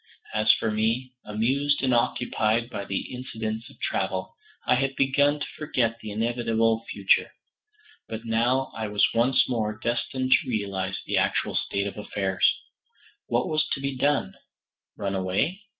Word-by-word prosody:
As 110 0 +5
for 110 - -1
me, 115 +4 0
amused 135 +7 0
and 130 -1 +3
occupied 120 -1 +1
by 100 - -4
the 100 +6 -3
incidents 110 -2 -4
of 135 - -18
travel, 95 -1 -2 0.3
I - - +4
had 135 +1 +1
begun 145 +2 +3
to - - -3
forget 120 -7 0
the 110 - -7
inevitable 115 0 +1
future; 100 -1 +2 0.8
but 115 +1 -5
now 120 +4 +1
I 110 -1 -3
was 105 -1 +3
once 120 +3 +3
more 110 -4 -1
destined 130 +3 -1
to - - +4
realize 100 -4 -2
the - - 0
actual - - +1
state 100 0 -1
of 100 - -5
affairs. 95 -2 +1 0.8
What 120 +1 +1
was 155 -1 +1
to - - -3
be 140 0 -2
done? 140 - +1 0.6
Run 100 -1 -2
away? 95 - 0
115 Hz, 150 wpm, -26 LUFS, 105-130 Hz, 0.8 s, As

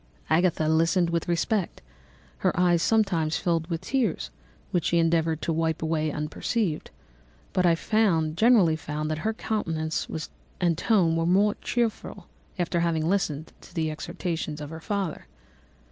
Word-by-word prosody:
Agatha 160 -1 +3
listened 165 +2 +2
with 170 -1 -1
respect, 175 +3 0 0.6
her - - +1
eyes 175 -2 +4
sometimes 180 -8 +2
filled 165 -2 0
with 165 -2 -2
tears, 250 -10 -1 0.4
which 175 -3 0
she 170 - +2
endeavoured 165 -1 +1
to 165 - 0
wipe 160 0 0
away 155 -1 0
unperceived; 155 +4 -2 0.6
but 180 -1 +3
I 170 - +5 0.6
generally 200 -4 +5
found 155 0 -4
that 155 - -2
her 220 +6 -1
countenance 160 -9 -2 0.5
and 175 -2 +2
tone 170 -3 +2
were 165 0 0
more 200 +4 +4
cheerful 235 -3 -2 0.3
after 175 -1 0
having 165 -2 +1
listened 160 -5 -1
to - - -16
the 160 -2 0
exhortations 160 -1 -4
of 150 0 -7
her 160 0 -7
father. 195 -3 -3
165 Hz, 145 wpm, -26 LUFS, 160-185 Hz, 0.6 s, I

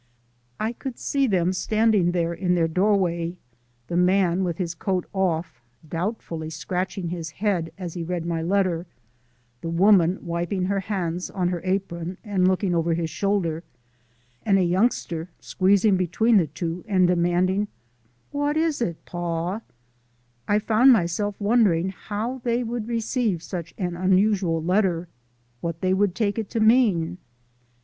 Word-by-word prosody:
I 220 +2 -1
could 255 0 -7
see 275 -1 0
them 185 -4 +1
standing 215 -2 +2
there 170 -1 0
in 180 +1 0
their 165 -2 +2
doorway, 180 -1 +1 0.5
the 170 - -4
man 180 0 +3
with 170 -3 -2
his 175 -3 -2
coat 185 0 -2
off, 165 -8 -1 0.3
doubtfully 165 -2 -4
scratching 180 +1 -3
his 165 -2 -4
head 175 -2 -1
as 180 -4 -6
he 175 - -4
read 170 0 -3
my 170 -1 -1
letter, 180 -1 0 0.7
the 165 - -4
woman 180 0 +4
wiping 175 +2 -1
her 195 +1 0
hands 180 -3 -3
on 180 -2 -1
her 175 -2 -3
apron 185 -2 -2
and 195 -4 +1
looking 185 0 +1
over 165 0 +1
his 165 -1 -2
shoulder, 170 -3 -1 0.8
and 200 -3 +3
a 190 - +3
youngster 175 -3 0
squeezing 195 +1 +3
between 210 +6 +3
the 170 -5 +3
two 165 +3 -4
and 185 -3 +3
demanding, 180 +3 +2 0.6
"What 290 +1 0
is 315 -4 +1
it, 170 -8 -3
Paw?" 175 +3 -3 0.9
I 205 - +3
found 225 +5 +5
myself 205 0 +1
wondering 200 -5 +3
how 220 +6 -4
they 240 0 +1
would 230 -1 -4
receive 230 -5 -1
such 170 -2 -6
an 175 -2 -2
unusual 185 -2 +2
letter, 180 -2 +1 0.5
what 165 +2 -4
they 185 0 +2
would 195 -1 +1
take 210 0 0
it 220 - -4
to 230 - -2
mean. 210 -7 +3
185 Hz, 150 wpm, -24 LUFS, 170-205 Hz, 0.9 s, found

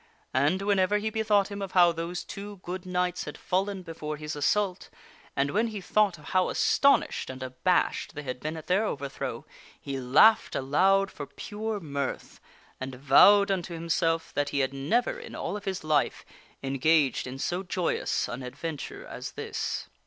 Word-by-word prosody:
And 150 +9 +2
whenever 200 0 +3
he 220 +1 -2
bethought 210 -2 +2
him 200 0 -6
of 195 -1 -5
how 175 -2 +6
those 170 +2 -4
two 205 +1 -8
good 185 +1 -6
knights 180 -1 -1
had 150 - -7
fallen 190 +1 -1
before 155 -3 -5
his 150 0 -5
assault, 185 +6 0 0.5
and 140 +1 +1
when 220 +4 +2
he 215 -2 -5
thought 200 -1 +2
of 150 - -12
how 185 -1 +2
astonished 280 +1 +2
and 130 0 -6
abashed 130 +8 0
they 150 - -5
had 130 -2 -5
been 155 +3 -4
at 160 - -8
their 190 +4 +2
overthrow, 140 -9 -4 0.3
he 135 -1 -4
laughed 140 - +5
aloud 190 +9 +3
for 145 - -7
pure 215 0 -5
mirth, 140 -5 -4 0.4
and 130 0 -5
vowed 200 +10 +6
unto 175 -3 -2
himself 165 0 0
that 145 0 0
he 140 - 0
had 135 0 -1
never 230 - 0
in 480 - -9
all - - -3
of 210 0 -7
his 190 -3 -3
life 155 -2 +1 0.4
engaged 135 +1 +2
in 130 +1 -6
so 175 +6 -2
joyous 185 -2 -1
an 120 +3 -5
adventure 140 +4 -6
as - - -7
this. - - -4
175 Hz, 175 wpm, -28 LUFS, 140-200 Hz, 0.5 s, how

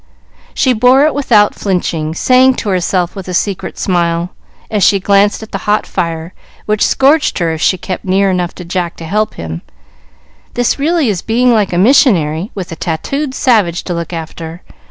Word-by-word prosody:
She 260 -3 +2
bore 250 +5 +4
it 310 - +1
without 230 -7 +3
flinching, 165 -5 -2
saying 255 +5 +4
to 215 - -4
herself 180 -1 0
with 195 -2 -8
a 180 - -3
secret 195 0 -2
smile, 170 -1 -1 0.4
as 210 -3 +1
she 200 +3 +4
glanced 200 +2 +2
at 220 - -12
the - - -3
hot 210 +1 +2
fire, 165 +1 -4 0.3
which 210 0 0
scorched 285 +3 +2
her 170 -3 0
if 160 -1 -5
she 185 - +2
kept 185 +1 -5
near 195 +1 +1
enough 180 -1 -2
to 180 - -9
Jack 175 -1 -3
to 165 - -8
help 210 +5 -1
him, 80 0 -6 0.9
"This 245 +3 0
really 315 0 +1
is 185 -4 -2
being 240 +2 +2
like 210 -4 +1
a 175 - -1
missionary, 185 - +3
with 185 -4 -6
a - - -5
tattooed 260 - -3
savage 205 - +1
to 180 - -4
look 170 -1 -4
after. 165 0 -7
190 Hz, 185 wpm, -14 LUFS, 170-225 Hz, 0.9 s, bore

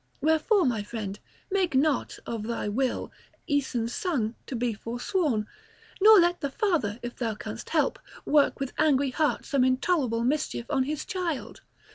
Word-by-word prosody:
Wherefore, 320 +5 +3
my 230 -4 +1
friend, 205 -2 -5 0.3
make 370 -6 +1
not, 280 0 +1
of 230 -2 -4
thy 235 -2 -2
will, 250 +5 -1 0.3
Aeson's 255 -5 -1
son 275 - -1
to 265 - -4
be 240 -1 0
forsworn, 240 - -1 0.6
nor 430 0 +9
let 350 0 +2
the 280 - -1
father, 285 - 0
if 240 0 -5
thou 225 -3 -2
canst - - -7
help, - - +1 0.3
work 290 -1 +3
with 275 -2 -3
angry 280 -3 +3
heart 305 +2 0
some 275 -3 +2
intolerable 255 -2 +1
mischief 260 -2 -1
on 265 -3 +2
his 300 +1 -3
child. 350 -7 -4
270 Hz, 155 wpm, -27 LUFS, 235-315 Hz, 0.6 s, nor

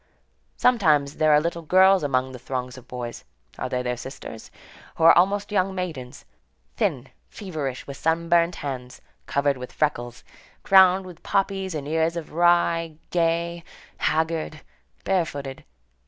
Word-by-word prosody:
Sometimes 155 - +3
there 155 0 +3
are 150 - +6
little 170 +2 -3
girls 190 +4 +5
among 130 -2 0
the 125 - -9
throng 125 0 -4
of 130 -1 -13
boys,—are 120 - -8
they 125 0 -2
their 125 0 -1
sisters?—who 130 +4 -10
are 165 - +8
almost 200 +4 +2
young 190 -1 +1
maidens, 155 -9 -6 0.5
thin, - - -1 0.2
feverish, 150 -10 -5
with 140 -1 -8
sunburnt 170 +1 +2
hands, 125 -3 -6 0.3
covered 140 -1 +1
with 125 0 -8
freckles, 120 -5 -2 0.4
crowned 190 -1 +6
with 180 -2 -12
poppies 195 -2 -1
and 145 -2 -5
ears 160 +2 0
of 165 - -7
rye, 170 -1 +2
gay, 170 0 0 0.3
haggard, 160 -1 -1 0.4
barefooted. 145 -8 -2
160 Hz, 130 wpm, -24 LUFS, 135-175 Hz, 0.5 s, are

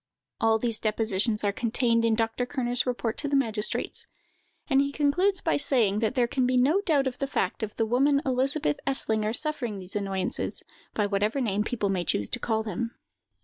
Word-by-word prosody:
All 225 0 +3
these 230 0 +1
depositions 215 0 0
are 205 - +2
contained 230 +1 +1
in 225 -1 +3
Dr. 225 +2 -1
Kerner's 245 -2 -1
report 240 -2 -2
to 290 - -2
the 280 - 0
magistrates; 225 -5 0 0.6
and 270 -2 +4
he 280 0 -1
concludes 355 +8 +1
by 325 - +1
saying, 225 -8 +3
that 225 +3 -1
there 250 -2 +3
can 250 +1 0
be 255 0 +2
no 295 +10 +3
doubt 305 -8 +2
of 255 -1 -3
the 275 - -1
fact 190 -9 -2
of 215 -1 -4
the 225 - 0
woman 275 +5 +3
Elizabeth 260 - 0
Eslinger 220 -5 +1
suffering 265 -9 -1
these 185 +1 -6
annoyances, 195 -2 -2 0.3
by 210 - +1
whatever 205 +5 0
name 210 -5 0
people 215 -3 -2
may 185 -2 0
choose 105 - -1
to - - -3
call 220 -1 -1
them. 230 +3 -4
230 Hz, 190 wpm, -27 LUFS, 215-270 Hz, 0.6 s, and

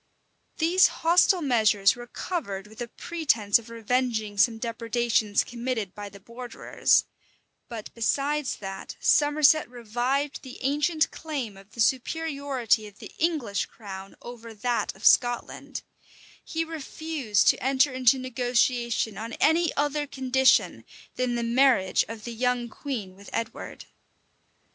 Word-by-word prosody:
These 350 +3 +5
hostile 350 +2 +3
measures 215 -6 +3
were 240 0 -10
covered 205 - -4
with 220 +2 -12
a 240 - -3
pretence 235 - +1
of 230 0 -14
revenging 230 -2 -1
some 225 +3 +3
depredations 230 -2 0
committed 235 -5 -4
by 205 -1 -7
the 200 0 -14
borderers: 235 +4 0 0.6
but 225 -3 -8
besides 280 +5 0
that 195 -1 -7
Somerset 295 -1 +4
revived 245 +4 -2
the 260 -2 -10
ancient 300 +4 +1
claim 275 -10 -5
of 195 +1 -17
the - - -13
superiority 265 -3 0
of 205 0 -15
the - - -11
English 300 -12 0
crown 195 -3 -10
over 230 -2 -10
that 240 +3 -1
of - - -10
Scotland, 245 -2 +2 0.6
he 330 0 -2
refused 310 -7 -1
to - - +1
enter 265 +2 +3
into 255 +1 +4
negotiation 245 -3 0
on 225 +1 -6
any 325 +1 +3
other 290 0 0
condition 265 -1 +2 0.3
than 250 -1 -1
the 235 - -1
marriage 235 -5 +3
of 225 -1 -8
the 235 - -6
young 245 0 0
queen 220 -9 -6
with 200 +1 -13
Edward. 230 - -5
245 Hz, 130 wpm, -26 LUFS, 220-280 Hz, 0.6 s, These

